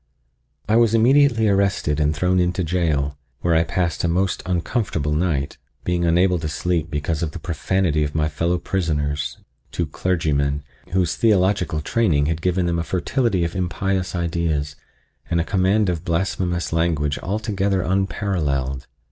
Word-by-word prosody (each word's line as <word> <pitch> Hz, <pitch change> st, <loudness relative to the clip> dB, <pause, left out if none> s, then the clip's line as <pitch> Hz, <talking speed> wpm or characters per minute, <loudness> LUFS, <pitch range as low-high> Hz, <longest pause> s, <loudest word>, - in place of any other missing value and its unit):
I 110 Hz, +2 st, +3 dB
was 115 Hz, -1 st, +4 dB
immediately 120 Hz, -1 st, +4 dB
arrested 100 Hz, -7 st, +1 dB
and 75 Hz, 0 st, +1 dB
thrown 90 Hz, +5 st, +2 dB
into 90 Hz, +1 st, +1 dB
jail, 75 Hz, -5 st, 0 dB, 0.2 s
where 85 Hz, -, +2 dB
I 80 Hz, 0 st, +4 dB
passed 85 Hz, 0 st, -1 dB
a -, -, +2 dB
most 90 Hz, +3 st, 0 dB
uncomfortable 90 Hz, -, -1 dB
night, 75 Hz, -4 st, -1 dB, 0.2 s
being 90 Hz, -1 st, 0 dB
unable 90 Hz, +2 st, +3 dB
to 80 Hz, -1 st, -3 dB
sleep 85 Hz, +1 st, -1 dB
because 75 Hz, +1 st, -2 dB
of 80 Hz, -3 st, -2 dB
the -, -, -6 dB
profanity 85 Hz, -1 st, 0 dB
of 75 Hz, 0 st, -3 dB
my 80 Hz, -1 st, +2 dB
fellow 85 Hz, +3 st, 0 dB
prisoners, 75 Hz, -8 st, -2 dB, 0.3 s
two 85 Hz, -, -1 dB
clergymen, 75 Hz, -3 st, 0 dB, 0.3 s
whose 90 Hz, -2 st, +1 dB
theological 95 Hz, -7 st, +2 dB
training 80 Hz, -7 st, +1 dB
had 80 Hz, +1 st, -1 dB
given 90 Hz, +1 st, +1 dB
them 85 Hz, -1 st, 0 dB
a -, -, -1 dB
fertility 95 Hz, +2 st, 0 dB
of 85 Hz, +2 st, -3 dB
impious 95 Hz, +1 st, -1 dB
ideas 80 Hz, -4 st, -1 dB, 0.5 s
and 85 Hz, -, +1 dB
a -, -, +2 dB
command 95 Hz, +3 st, +2 dB
of 85 Hz, -2 st, -2 dB
blasphemous 90 Hz, 0 st, -1 dB
language 80 Hz, -3 st, 0 dB
altogether 100 Hz, -2 st, -1 dB
unparalleled. 80 Hz, -9 st, -1 dB
85 Hz, 150 wpm, -22 LUFS, 75-95 Hz, 0.5 s, was